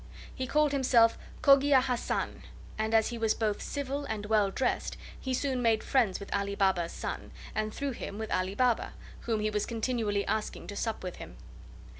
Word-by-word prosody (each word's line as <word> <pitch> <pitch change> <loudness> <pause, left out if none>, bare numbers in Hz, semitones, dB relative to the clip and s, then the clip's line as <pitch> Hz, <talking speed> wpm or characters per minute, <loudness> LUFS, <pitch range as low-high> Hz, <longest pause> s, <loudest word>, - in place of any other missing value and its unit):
He 260 - -4
called 300 +1 +3
himself 250 -4 +4 0.3
Cogia 275 0 +7
Hassan, 250 -2 -2 0.3
and 220 +1 0
as 220 -1 +4
he 240 -1 -5
was 225 -1 +2
both 215 -2 -1
civil 285 0 -3
and 215 -4 -4
well 210 -2 +3
dressed 255 +7 -1 0.2
he 260 - -4
soon 260 0 0
made 225 -2 +2
friends 230 -9 +2
with 200 - -6
Ali 200 0 -1
Baba's 190 -4 +2
son, - - -5 0.2
and 215 0 -1
through 280 +4 -3
him 205 -4 -6
with 220 0 -5
Ali 185 +2 0
Baba, 245 0 +1 0.3
whom 220 -2 +1
he 215 0 0
was 210 -1 -1
continually 225 -3 -1
asking 220 -1 -2
to 205 - -7
sup 225 0 -2
with 180 -1 -5
him. - - -10
225 Hz, 185 wpm, -30 LUFS, 210-260 Hz, 0.3 s, Cogia